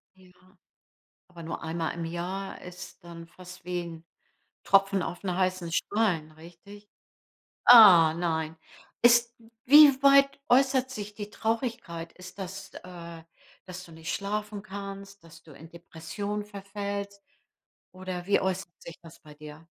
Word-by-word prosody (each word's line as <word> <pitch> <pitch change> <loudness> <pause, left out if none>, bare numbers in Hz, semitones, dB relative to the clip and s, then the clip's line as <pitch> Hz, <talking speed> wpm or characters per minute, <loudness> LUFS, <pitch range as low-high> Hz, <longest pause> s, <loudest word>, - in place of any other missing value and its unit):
Ja. 185 -1 -21 1.0
Aber 170 -2 -12
nur 165 - -6
einmal 160 0 -3
im 170 -1 -5
Jahr 180 +4 -5
ist 180 0 -11
dann 170 -1 -11
fast 180 0 -14
wie 180 -1 -3
'n 165 -1 -10 0.6
Tropfen 195 +1 +3
aufm 180 +2 -5
heißen 185 -2 -1
Stein, 175 -6 -1
richtig? 175 +6 -15 0.8
Ah, 185 -10 +9
nein. 160 -2 -3 0.4
Ist 235 0 +4 0.3
wie 285 0 +7
weit 275 0 +5
äußert 260 0 +3
sich 210 -5 -7
die 205 0 -8
Traurigkeit? 225 -8 -4
Ist 185 +2 -13
das, 195 +1 -8
äh, 170 -2 -11 0.4
dass 185 0 -9
du 165 - -16
nicht 160 0 -6
schlafen 205 0 -4
kannst, 200 -1 -9
dass 165 0 -16
du 155 - -16
in 160 +4 -14
Depressionen 175 +5 -6
verfällst? 200 0 -6 0.7
Oder 185 -1 -7
wie 200 - +2
äußert 190 -2 -4
sich 170 - -11
das 165 -1 -15
bei 150 -1 -15
dir? 150 +2 -13
185 Hz, 135 wpm, -27 LUFS, 170-205 Hz, 1.0 s, Ah